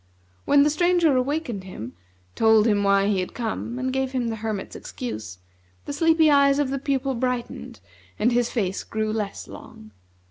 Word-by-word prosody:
When 285 Hz, 0 st, +5 dB
the 295 Hz, -, +3 dB
Stranger 345 Hz, -2 st, +3 dB
awakened 255 Hz, -5 st, -1 dB
him, 125 Hz, -, -8 dB, 0.4 s
told 220 Hz, -1 st, +4 dB
him 205 Hz, -3 st, +2 dB
why 200 Hz, 0 st, +3 dB
he 200 Hz, -2 st, +1 dB
had 185 Hz, -, -4 dB
come, 235 Hz, 0 st, -4 dB
and 260 Hz, 0 st, -2 dB
gave 265 Hz, 0 st, -1 dB
him 245 Hz, -3 st, -1 dB
the 225 Hz, -, -4 dB
hermit's 215 Hz, -2 st, -4 dB
excuse, 110 Hz, -, -7 dB, 0.5 s
the -, -, -4 dB
sleepy 320 Hz, 0 st, +4 dB
eyes 280 Hz, -1 st, +5 dB
of 285 Hz, -2 st, 0 dB
the 275 Hz, -, -2 dB
Pupil 270 Hz, -1 st, -1 dB
brightened, 250 Hz, -1 st, -4 dB, 0.4 s
and 230 Hz, +4 st, +2 dB
his 240 Hz, 0 st, +1 dB
face 195 Hz, -5 st, -2 dB
grew 215 Hz, 0 st, -2 dB
less 210 Hz, -2 st, -4 dB
long. 110 Hz, 0 st, -12 dB
245 Hz, 175 wpm, -24 LUFS, 210-280 Hz, 0.5 s, When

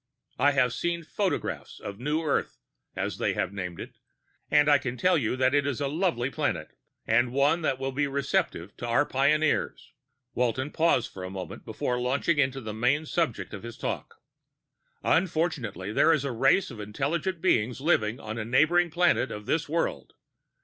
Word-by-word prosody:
I 145 Hz, +2 st, +4 dB
have 125 Hz, -3 st, +2 dB
seen 170 Hz, +4 st, -2 dB
photographs 195 Hz, +4 st, -3 dB
of 100 Hz, +1 st, -7 dB
New 150 Hz, +5 st, -1 dB
Earth, 150 Hz, -, -1 dB, 0.4 s
as -, -, -3 dB
they -, -, +1 dB
have 95 Hz, -, -1 dB
named 90 Hz, -3 st, -5 dB
it, -, -, -9 dB, 0.5 s
and 150 Hz, -1 st, +4 dB
I 145 Hz, -1 st, +6 dB
can 125 Hz, -2 st, -4 dB
tell 180 Hz, +4 st, +3 dB
you 125 Hz, -6 st, 0 dB
that 130 Hz, 0 st, +2 dB
it 145 Hz, 0 st, +2 dB
is 140 Hz, -4 st, -2 dB
a 140 Hz, -, 0 dB
lovely 145 Hz, -4 st, 0 dB
planet... -, -, -2 dB, 0.3 s
and 120 Hz, +2 st, +3 dB
one 140 Hz, +6 st, +2 dB
that 135 Hz, -5 st, 0 dB
will 135 Hz, 0 st, -3 dB
be 145 Hz, +2 st, 0 dB
receptive 140 Hz, -, -1 dB
to 120 Hz, -, -5 dB
our 120 Hz, +5 st, +3 dB
pioneers." 145 Hz, +3 st, +1 dB, 0.4 s
Walton 125 Hz, +3 st, 0 dB
paused 160 Hz, -8 st, +1 dB
a 95 Hz, -1 st, -5 dB
moment 95 Hz, -3 st, -7 dB
before 125 Hz, 0 st, -2 dB
launching 140 Hz, +5 st, +1 dB
into 135 Hz, -1 st, +1 dB
the 110 Hz, -3 st, -5 dB
main 125 Hz, +8 st, +1 dB
subject 125 Hz, -, -1 dB
of 100 Hz, -, -6 dB
his 115 Hz, 0 st, -8 dB
talk. -, -, -4 dB, 0.9 s
"Unfortunately, 155 Hz, -, 0 dB
there 165 Hz, -, +5 dB
is 150 Hz, -4 st, +1 dB
a 140 Hz, -, -1 dB
race 135 Hz, +9 st, +3 dB
of 115 Hz, -, -9 dB
intelligent 145 Hz, -, -2 dB
beings 125 Hz, -, +1 dB
living 125 Hz, -6 st, +1 dB
on 110 Hz, +1 st, -5 dB
a -, -, -2 dB
neighboring 155 Hz, +9 st, +3 dB
planet 170 Hz, -5 st, +2 dB
of 105 Hz, 0 st, -7 dB
this 160 Hz, +3 st, 0 dB
world. 165 Hz, +2 st, -2 dB
135 Hz, 175 wpm, -27 LUFS, 115-155 Hz, 0.9 s, I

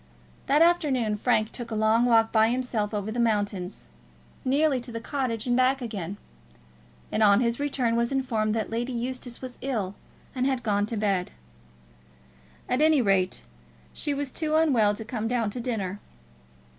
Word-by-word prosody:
That 295 Hz, +4 st, +5 dB
afternoon 275 Hz, -11 st, +2 dB
Frank 215 Hz, -1 st, +1 dB
took 240 Hz, -2 st, -6 dB
a 220 Hz, -, -3 dB
long 220 Hz, +2 st, +3 dB
walk 225 Hz, -2 st, +4 dB
by 220 Hz, 0 st, +4 dB
himself 240 Hz, -4 st, -1 dB
over 210 Hz, 0 st, -3 dB
the 240 Hz, -, -3 dB
mountains, 205 Hz, -5 st, -1 dB, 0.6 s
nearly 275 Hz, 0 st, +2 dB
to 240 Hz, -, -8 dB
the 230 Hz, -, -4 dB
Cottage 230 Hz, -3 st, -3 dB
and 245 Hz, -1 st, +1 dB
back 255 Hz, +2 st, +3 dB
again; 205 Hz, -6 st, -5 dB, 0.9 s
and 215 Hz, -, 0 dB
on 205 Hz, -1 st, +6 dB
his 235 Hz, 0 st, 0 dB
return 265 Hz, -5 st, 0 dB
was 235 Hz, +1 st, +1 dB
informed 225 Hz, -5 st, 0 dB
that 220 Hz, -1 st, -2 dB
Lady 240 Hz, +3 st, -2 dB
Eustace 245 Hz, +1 st, -5 dB
was 255 Hz, -1 st, -8 dB
ill, 215 Hz, -8 st, -2 dB, 0.4 s
and 255 Hz, 0 st, 0 dB
had 265 Hz, -2 st, -1 dB
gone 205 Hz, -1 st, +1 dB
to 225 Hz, -, -3 dB
bed. 195 Hz, -4 st, 0 dB, 1.4 s
At 250 Hz, +3 st, 0 dB
any 310 Hz, -1 st, +5 dB
rate, 185 Hz, -, +1 dB, 0.5 s
she 295 Hz, -, -2 dB
was 280 Hz, -1 st, -2 dB
too 310 Hz, -1 st, -1 dB
unwell 245 Hz, -10 st, +3 dB
to 220 Hz, -, -8 dB
come 225 Hz, -1 st, -3 dB
down 230 Hz, -3 st, 0 dB
to 245 Hz, -, -5 dB
dinner. 205 Hz, -5 st, -3 dB
235 Hz, 170 wpm, -26 LUFS, 215-255 Hz, 1.4 s, on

